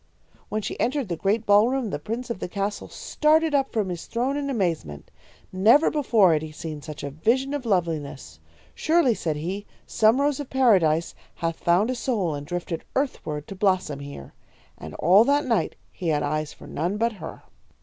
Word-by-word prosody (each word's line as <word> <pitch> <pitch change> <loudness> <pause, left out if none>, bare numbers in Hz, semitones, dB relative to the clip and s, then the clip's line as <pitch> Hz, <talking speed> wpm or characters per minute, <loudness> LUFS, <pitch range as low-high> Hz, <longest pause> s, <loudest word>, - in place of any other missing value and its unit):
"When 215 0 -2
she - - -5
entered 260 -3 0
the 170 - -1
great 210 +6 0
ballroom, 225 +3 +3
the 145 - -3
prince 235 +9 -4
of 230 - -4
the - - -3
castle 200 +3 -3
started 310 +1 +1
up 275 -1 +1
from 210 -4 -1
his 175 -2 -6
throne 250 +4 -1
in 285 -1 -2
amazement. 165 - -2 0.4
Never 225 +11 +5
before 225 - +4
had 155 - +1
he 155 -1 -7
seen 155 -1 -7
such 150 0 -8
a 140 - -4
vision 245 - +1
of 275 -4 -3
loveliness. 150 - -2 0.3
'Surely,' 315 -6 +3
said 160 -7 -2
he, 185 +7 -4 0.2
'some 220 +4 +3
rose 285 0 +1
of 285 - -6
Paradise 180 -11 +3 0.2
hath 165 -1 -2
found 185 +8 +2
a - - -2
soul 215 - -1
and 145 0 -6
drifted 175 -1 -4
earthward 155 - -2
to - - -7
blossom 185 -7 0
here.' 140 - -9 0.4
And 80 0 -9
all 190 +6 +6
that 285 +2 +2
night 230 -4 0 0.2
he 180 - -6
had 150 -2 +1
eyes 155 +1 -2
for - - -14
none 175 +7 -2
but 230 +2 +1
her. - - -8
195 Hz, 190 wpm, -25 LUFS, 160-250 Hz, 0.4 s, all